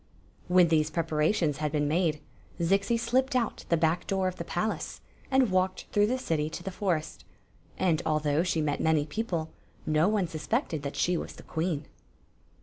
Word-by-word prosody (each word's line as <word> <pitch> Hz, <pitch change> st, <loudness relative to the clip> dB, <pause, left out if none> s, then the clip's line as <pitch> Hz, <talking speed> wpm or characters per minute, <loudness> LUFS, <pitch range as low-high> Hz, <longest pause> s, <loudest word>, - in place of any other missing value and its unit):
When 180 Hz, -1 st, +5 dB
these 155 Hz, -1 st, +3 dB
preparations 155 Hz, -1 st, +1 dB
had 150 Hz, -1 st, -1 dB
been 145 Hz, -1 st, +1 dB
made, 155 Hz, -1 st, +1 dB, 0.4 s
Zixi 195 Hz, +7 st, +2 dB
slipped 260 Hz, +3 st, +1 dB
out 235 Hz, -3 st, -1 dB
the 170 Hz, -, +3 dB
back 160 Hz, +1 st, +1 dB
door 190 Hz, -1 st, +1 dB
of 185 Hz, 0 st, -3 dB
the -, -, -4 dB
palace 175 Hz, +6 st, -3 dB, 0.3 s
and 265 Hz, -5 st, +3 dB
walked 185 Hz, 0 st, +1 dB
through 205 Hz, 0 st, +3 dB
the 255 Hz, +3 st, 0 dB
city 155 Hz, -10 st, -1 dB
to 175 Hz, -, -7 dB
the 190 Hz, -, -4 dB
forest; 180 Hz, -5 st, -2 dB, 0.5 s
and, 170 Hz, -4 st, +2 dB
although 155 Hz, -1 st, +1 dB
she 170 Hz, -2 st, 0 dB
met 145 Hz, -1 st, -1 dB
many 160 Hz, -2 st, +2 dB
people, 170 Hz, -2 st, -3 dB, 0.3 s
no 155 Hz, +2 st, +3 dB
one 210 Hz, -3 st, +2 dB
suspected 165 Hz, -, -2 dB
that 140 Hz, 0 st, -5 dB
she 180 Hz, 0 st, +1 dB
was -, -, -5 dB
the -, -, -13 dB
queen. 160 Hz, -2 st, -2 dB
170 Hz, 175 wpm, -29 LUFS, 155-195 Hz, 0.5 s, When